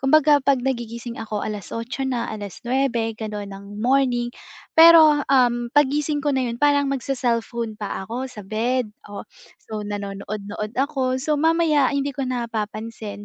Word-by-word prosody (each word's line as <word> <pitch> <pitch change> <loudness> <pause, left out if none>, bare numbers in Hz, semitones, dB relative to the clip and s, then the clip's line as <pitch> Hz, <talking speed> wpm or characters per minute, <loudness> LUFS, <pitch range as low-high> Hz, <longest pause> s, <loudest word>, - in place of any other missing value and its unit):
kumbaga 295 +2 +5
pag 275 -3 +3
nagigising 235 -2 -4
ako 215 -2 -4
8:00 230 +5 -4
na, 240 -3 -1
9:00 235 +3 -2
gano'n 210 -2 -5
ng 195 +1 -10 0.2
morning, 245 -1 +2 0.5
pero, 320 -3 +8
um, 240 -3 +3
'pag 290 -2 +5
gising 295 +1 -1
ko 290 0 0
na 260 - +1
'yon 235 +2 -5
parang 285 -1 +4
mag-se-cellphone 235 -4 -2
pa 200 -1 -4
ako 250 +6 -4
sa 210 -5 -10
bed. 225 +2 -1 0.2
Oh, 205 - -7 0.3
so 215 -1 -7
nanonood-nood 205 0 -5
ako, 265 -2 0
so 260 +4 -1
mamaya 320 -4 +3
hindi 280 0 -1
ko 275 - -1
napapansin 220 -3 -4
240 Hz, 145 wpm, -22 LUFS, 215-275 Hz, 0.5 s, pero